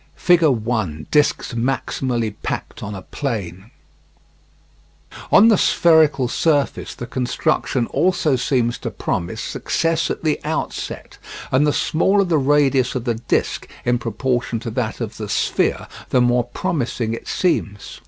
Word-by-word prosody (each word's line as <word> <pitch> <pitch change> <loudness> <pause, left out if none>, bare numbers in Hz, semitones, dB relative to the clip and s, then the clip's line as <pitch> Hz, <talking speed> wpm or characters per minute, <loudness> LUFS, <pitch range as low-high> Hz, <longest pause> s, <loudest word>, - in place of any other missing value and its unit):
[Figure 170 -3 +4
1: 110 - -2
Discs 150 -3 +2
maximally 120 -2 -1
packed - - -5
on 105 -1 -5
a 95 - -8
plane] 100 - -5 1.6
On 220 +3 +7
the 215 - +4
spherical 155 -6 +4
surface 145 +2 0
the 120 - -6
construction 125 0 -1
also 165 -1 +1
seems 125 -1 0
to - - -4
promise 85 - -3
success 165 0 -1
at - - -4
the 155 -2 +1
outset, 155 +1 -4 0.3
and 135 +3 +3
the - - +3
smaller 190 +7 +2
the 170 -5 +1
radius 135 -2 +2
of 125 - -2
the 120 -1 0
disc 115 +1 -1 0.2
in 120 0 +2
proportion 120 +1 -2
to 115 - -5
that 115 0 -3
of 115 -1 -5
the 105 -2 -6
sphere, - - 0 0.2
the 130 - +3
more 120 0 +3
promising 120 -5 -2
it 115 - -7
seems. 105 - -1
125 Hz, 140 wpm, -20 LUFS, 115-150 Hz, 1.6 s, On